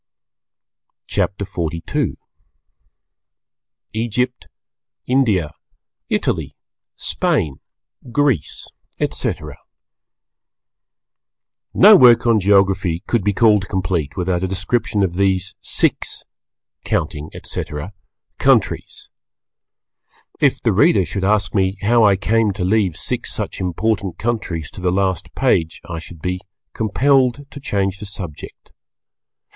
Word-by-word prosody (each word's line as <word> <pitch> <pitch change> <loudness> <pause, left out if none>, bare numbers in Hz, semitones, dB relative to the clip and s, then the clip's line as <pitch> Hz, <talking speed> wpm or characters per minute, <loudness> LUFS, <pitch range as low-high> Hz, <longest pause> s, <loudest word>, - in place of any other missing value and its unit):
CHAPTER 100 +1 -1
XLII 85 -4 -3 1.8
EGYPT, 120 +3 -2 0.6
INDIA, 110 - +1 0.6
ITALY, - - -1 0.4
SPAIN, 70 -4 -1 0.5
GREECE, 135 - 0 0.3
ETC. - - -1 2.4
No 210 +2 +9
work 125 - +7
on 115 -2 +4
Geography 95 -3 +2
could 120 -5 0
be 105 - +2
called 105 -1 +3
complete 85 -6 -2
without 90 -1 0
a - - +1
description 100 +2 -1
of 90 -2 -2
these 95 -1 +1
six - - 0 0.6
(counting, 75 +1 -2
etc.) 75 +7 -5 0.5
countries. - - +1 1.3
If - - +3
the - - +2
Reader - - +4
should 100 - -4
ask 100 -2 +1
me 95 -1 +1
how 115 +2 +4
I 100 -2 +5
came 105 +2 +1
to 95 -1 -4
leave 95 -4 +1
six - - -3
such - - -4
important 95 +1 -1
countries 100 - -3
to - - -10
the 90 -1 +1
last 95 -1 -1
page, 80 -1 +1
I 85 -1 -5
should 80 -1 -12
be 90 0 -2 0.3
compelled 130 +4 +2
to 145 - -9
change 95 -6 -1
the 105 - -7
subject. 90 -6 -9
100 Hz, 105 wpm, -19 LUFS, 90-110 Hz, 2.4 s, No